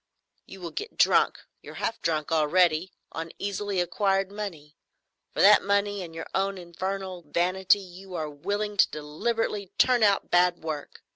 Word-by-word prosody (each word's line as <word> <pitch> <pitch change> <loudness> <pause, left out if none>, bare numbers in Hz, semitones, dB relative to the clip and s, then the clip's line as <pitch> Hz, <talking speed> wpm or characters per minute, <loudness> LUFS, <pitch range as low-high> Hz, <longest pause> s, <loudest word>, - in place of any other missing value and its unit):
You 195 - -11
will 170 - -5
get 425 +3 -6
drunk—you're - - +1
half 225 - -3
drunk 155 -1 -1
already—on 165 +1 +1
easily 200 -1 -2
acquired 195 +2 +1
money. 170 -8 -7 0.6
For - - -1
that 205 +1 +8
money 200 0 +1
and 165 -2 -8
your 165 - -5
own 195 0 0
infernal 185 +1 -5
vanity 185 +5 +2
you 185 0 -11
are 155 -2 -2
willing 205 +8 -3
to - - +5
deliberately 195 +6 -2
turn 250 -2 +4
out 200 -2 +3
bad 175 -1 +3
work. 155 -2 -6
185 Hz, 145 wpm, -27 LUFS, 165-200 Hz, 0.6 s, that